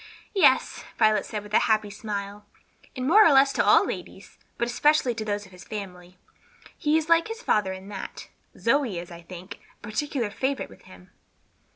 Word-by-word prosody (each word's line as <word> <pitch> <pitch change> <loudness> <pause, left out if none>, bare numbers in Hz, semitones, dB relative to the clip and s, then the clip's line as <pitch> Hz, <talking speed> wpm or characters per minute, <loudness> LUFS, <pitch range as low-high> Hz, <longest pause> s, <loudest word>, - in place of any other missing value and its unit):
"Yes," 390 - +3
Violet 215 -1 +3
said, 210 -1 -5
with 210 0 -13
a - - +6
happy 215 -1 +1
smile, 205 -1 -6 0.5
"and 255 -1 -3
more 415 +10 +7
or - - +6
less 275 0 +5
to - - +2
all - - +5
ladies; - - -8 0.2
but 235 - 0
especially 270 +1 +2
those 210 -2 -3
of 190 - -17
this 180 0 -13
family. 180 -4 -8 0.6
He 305 -1 +1
is 315 -1 -2
like 335 +2 +4
his 455 +2 -7
father 205 -3 +1
in 190 +1 -8
that. 200 -2 -8 0.3
Zoe 240 -5 +1
is, 170 +1 -7
I 170 0 -10
think, 180 +3 -10 0.2
a - - -41
particular 230 +1 -2
favorite 265 +5 -2
with 95 - -17
him." 90 0 -16
215 Hz, 185 wpm, -25 LUFS, 195-275 Hz, 0.6 s, more